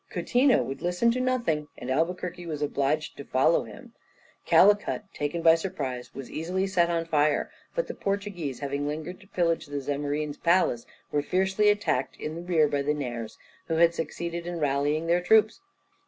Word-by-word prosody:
Coutinho 255 0 +2
would 135 +1 -6
listen 180 +7 +2
to 255 +2 -1
nothing, 235 -13 0
and 130 - -5
Albuquerque 175 +4 -2
was 150 -2 -3
obliged 145 +1 -1
to 140 - -7
follow 130 -1 +2
him. - - -13 0.5
Calicut, 205 +1 +4
taken 150 +3 -3
by 165 - +8
surprise, 140 -8 -3
was 135 - -8
easily 180 +5 -1
set 180 -3 +2
on 165 -1 0
fire; 150 -2 +1 0.2
but - - 0
the - - -6
Portuguese, 195 -9 -3
having 140 +1 -2
lingered 155 +4 -5
to 195 - -18
pillage 170 -4 0
the 145 0 -3
Zamorin's 145 +1 -2
palace, 170 -9 +2 0.2
were 145 - +1
fiercely 190 +6 +2
attacked 205 -10 0
in 165 +3 -6
rear 160 -4 +4
by 145 -1 -1
the 150 +2 0
Nairs, 120 -6 -5 0.3
who 165 - 0
had 170 +1 +5
succeeded 170 +1 -4
in 175 -1 -4
rallying 145 +2 0
their 170 +1 +2
troops. 220 - +3
165 Hz, 170 wpm, -27 LUFS, 145-180 Hz, 0.5 s, by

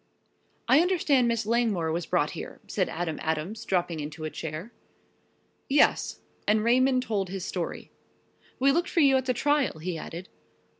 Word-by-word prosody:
"I 270 - +6
understand 320 -8 +3
Miss 230 -2 0
Langmore 215 -8 +1
was 170 0 -2
brought - - +1
here," - - -8
said - - -1
Adam 165 -2 -3
Adams, 160 +8 -2
dropping 175 -3 0
into 150 +1 -6
a 155 - -3
chair. 160 +8 -6 1.0
"Yes," 285 +2 +3 0.3
and 215 +1 +3
Raymond 255 +2 +3
told 200 -6 -2
his 190 -1 -5
story. 175 -3 -4 0.7
"We 275 +2 +4
looked 340 +5 +1
for 335 - +2
you 275 -2 +5
at 260 - -2
the 255 - +2
trial," 290 - +1
he 165 +1 -4
added. 170 +4 -7
215 Hz, 160 wpm, -27 LUFS, 165-260 Hz, 1.0 s, I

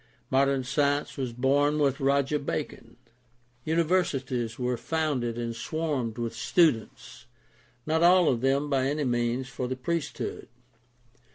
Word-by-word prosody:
Modern 135 0 +2
science 140 +2 0
was 130 -4 -3
born 140 +5 +2
with 140 -3 +1
Roger 140 +1 +1
Bacon. 125 -5 -5 0.7
Universities 140 -8 0
were 125 0 -1
founded 130 -4 -2
and 115 -1 -3
swarmed 140 -4 -3
with 120 -1 -3
students 130 -5 0 0.3
— 120 +1 -34
not 160 +1 +1
all 175 0 +6
of 120 -3 +1
them 135 +2 +1
by 135 -2 +1
any 150 +2 -1
means 120 0 0
for 125 -1 -4
the 130 - -3
priest 155 +5 -3
hood. - - -5
135 Hz, 135 wpm, -27 LUFS, 125-150 Hz, 0.7 s, all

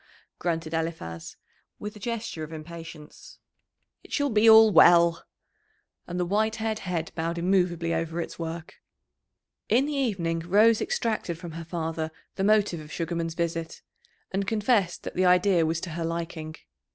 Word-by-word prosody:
grunted 165 -2 -2
Eliphaz, 160 - -4 0.4
with 210 +1 -7
a - - -11
gesture 230 -6 -4
of 155 - -8
impatience. 165 -1 -10 0.7
"It - - -17
shall 285 -2 0
be 220 +1 +5
all 220 0 +8
well." 170 -2 +6 0.8
And 175 +1 -4
the 180 - +1
white 215 +4 +1
haired 220 -1 -2
head 175 -5 -3
bowed 165 +1 -3
immovably 175 -2 +1
over 165 +1 -2
its 170 - -5
work. 165 0 -6 0.9
In 250 +5 +4
the 300 - -3
evening 190 -12 -1
Rose 210 +7 +4
extracted 225 - -2
from 170 0 -8
her 165 +1 -7
father 160 -1 -3 0.2
the 190 - -3
motive 205 -4 +3
of 155 0 -11
Sugarman's 165 -1 -3
visit, 165 -1 -3 0.5
and 195 0 -2
confessed 210 -4 +1
that - - -6
the 185 - +1
idea 180 -2 +4
was 160 0 -1
to 170 - -5
her 165 +1 -4
liking. 165 -1 -4
170 Hz, 155 wpm, -26 LUFS, 165-210 Hz, 0.9 s, all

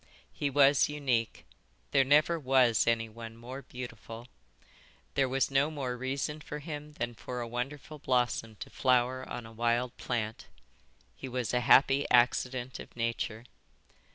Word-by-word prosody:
"He 145 - -1
was 140 0 +5
unique. 130 -6 -1 0.5
There 135 - +5
never 150 +5 +4
was 130 -5 +3
anyone 115 0 -2
more 125 +4 -8
beautiful. 120 -2 -9 0.9
There 135 -2 +2
was 135 +1 +1
no 135 +2 +3
more 135 -5 -3
reason 135 +4 -3
for 150 - -6
him 150 0 -7
than 120 -4 -3
for 125 +2 -6
a 120 - -4
wonderful 135 +5 -5
blossom 120 -4 0
to - - -7
flower 130 0 +1
on 120 - -6
a 115 - -11
wild 120 +2 0
plant. 110 -3 -3 0.7
He 130 - -7
was 125 -2 -2
a 125 - +3
happy 135 +3 +5
accident 125 +1 +2
of - - -11
nature." 115 -1 -2
125 Hz, 145 wpm, -30 LUFS, 120-140 Hz, 0.9 s, was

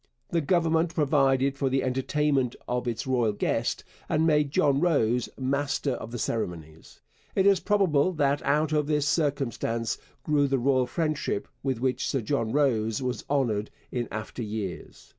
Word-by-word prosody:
The 170 - +2
Government 165 +1 +1
provided 135 -2 +2
for 135 - +1
the 135 +1 +1
entertainment 130 0 0
of 125 0 -2
its 115 -2 -2
royal 120 -5 +1
guest - - -1 0.3
and 155 +1 +2
made 150 -2 +3
John 140 0 +2
Rose 125 -8 +2
master 140 +1 -1
of 115 -3 -5
the 120 - -5
ceremonies. 80 -9 -5 0.3
It 190 - +3
is 200 -1 +5
probable 185 -6 +2
that 145 -2 +1
out 150 +2 +1
of 150 -1 +1
this 150 -1 +1
circumstance 135 -6 -1 0.2
grew 145 -2 +2
the 135 0 +1
royal 130 0 +2
friendship 155 -5 -2
with 135 -4 -1
which 130 0 0
Sir 135 - 0
John 115 -1 -1
Rose 115 -6 +1
was 125 -1 -2
honoured 115 -7 0 0.2
in 120 -2 -2
after 110 +3 -6
years. 105 -4 -6
135 Hz, 160 wpm, -27 LUFS, 120-150 Hz, 0.3 s, is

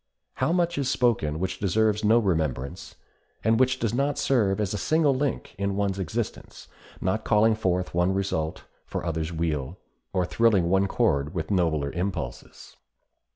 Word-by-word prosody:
How 130 +5 +1
much 170 -3 +1
is 135 -2 0
spoken 115 - +1
which 95 +2 -3
deserves 105 +2 +1
no 110 +2 +5
remembrance, 80 - -1 0.5
and 110 +1 +3
which 130 0 +3
does 115 -3 -1
not 140 +3 0
serve 110 -8 +2
as 105 -2 -1
a - - -1
single 155 -3 +2
link 135 0 -2
in 100 0 -1
one's 100 -1 -1
existence, 85 -4 -5 0.3
not 100 +4 -1
calling 110 +1 +4
forth 90 -4 -1
one 90 +2 +2
result 95 -5 -2 0.2
for - - -5
others' 80 0 -2
weal, 80 -1 -2 0.3
or 90 -2 +1
thrilling 100 -4 +2
one 95 +1 +3
chord 70 -4 0
with 80 0 -3
nobler 80 -7 +1
impulses! 85 -9 -5
95 Hz, 155 wpm, -26 LUFS, 85-115 Hz, 0.5 s, no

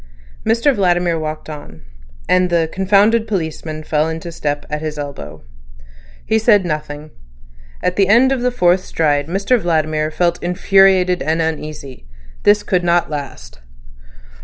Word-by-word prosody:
Mr 235 +6 +2
Vladimir 175 -5 +1
walked 155 0 -5
on, 145 - -10 0.4
and 185 0 +2
the 170 -2 +1
"confounded 205 +4 +2
policeman" 160 -5 -4
fell 155 +1 0
into 165 +1 -6
step 145 -3 -3
at 150 0 -4
his 155 -1 -5
elbow. 135 - -8 0.8
He 220 - +1
said 210 -4 +3
nothing. 150 -1 -5 0.7
At 180 - -1
the 195 -2 +3
end 240 +6 +4
of 265 -2 -1
the 250 - +1
fourth 185 -6 +2
stride 145 -5 0
Mr 200 +8 +1
Vladimir 155 -3 0
felt 170 +2 -1
infuriated 185 0 +3
and 160 +3 -1
uneasy. 155 - -5 0.3
This 205 0 +3
could 180 -3 0
not 175 -1 +1
last. 65 - -7
170 Hz, 140 wpm, -17 LUFS, 155-195 Hz, 0.8 s, end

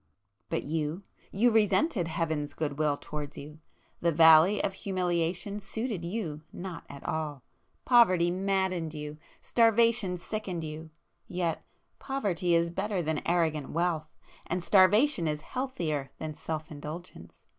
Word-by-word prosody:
But - - -1
you,—you 165 +8 -1
resented 220 - +2
Heaven's 160 -3 -2
good 145 -2 -3
will 150 -2 +2
towards 150 -1 -7
you,—the 155 +3 -5
Valley 160 +5 +7
of 195 - 0
Humiliation 185 +1 -1
suited 210 -1 -4
you 170 -5 -4
not 175 -3 -7
at 140 -1 -10
all. 150 -4 -3 0.4
Poverty 185 -9 +5
maddened 185 -3 -1
you,—starvation 205 +7 +1
sickened 185 -2 -4
you. 155 +1 -7 0.4
Yet 175 -2 -2 0.4
poverty 190 -10 0
is 170 0 +2
better 195 0 -1
than 155 -1 -1
arrogant 160 -4 +1
wealth,—and 170 +1 -3
starvation 200 - +4
is 150 -1 -2
healthier 165 - -3
than 155 -1 -5
self 155 +1 -5
indulgence! 155 +4 -9
170 Hz, 115 wpm, -29 LUFS, 155-195 Hz, 0.4 s, Valley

